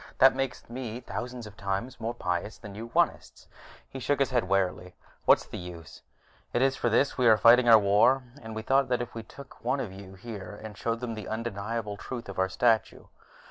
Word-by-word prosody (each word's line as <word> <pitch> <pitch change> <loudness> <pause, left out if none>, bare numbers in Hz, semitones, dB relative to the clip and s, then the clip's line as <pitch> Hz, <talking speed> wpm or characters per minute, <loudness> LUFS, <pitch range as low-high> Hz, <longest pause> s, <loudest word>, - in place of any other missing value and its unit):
That 135 0 +7
makes 135 0 -3
me 120 -1 -5
thousands 125 -1 -6
of 105 -1 -11
times 100 +7 -3
more 115 +1 -3
pious 90 0 -3
than 105 -3 -10
you 115 +3 -7
Onists." - - 0 0.4
He 135 - -8
shook 145 +3 +1
his 135 -1 +1
head 120 -5 +2
wearily. 90 -2 0 0.3
"What's - - +5
the - - -7
use? 85 -3 -10 0.5
It 120 - +2
is 135 0 +3
for 120 - 0
this 130 +4 +2
we 125 - +4
are 110 -1 +7
fighting 120 +2 +6
our 115 - +10
war, 105 +6 +4 0.2
and 110 -1 -8
we 110 - -4
thought 135 +1 +2
if 120 -1 -1
we 115 - -5
took 140 +5 -14
one 140 - 0
of 105 -8 -4
you 95 0 -11
here, 105 -1 -8
showed 115 +3 -3
him 120 -2 -3
the 110 -2 -7
undeniable 110 -1 -3
truth 120 +1 -7
of 95 - -6
our 95 0 +2
statue.... 110 +3 +1
115 Hz, 205 wpm, -28 LUFS, 100-125 Hz, 0.5 s, our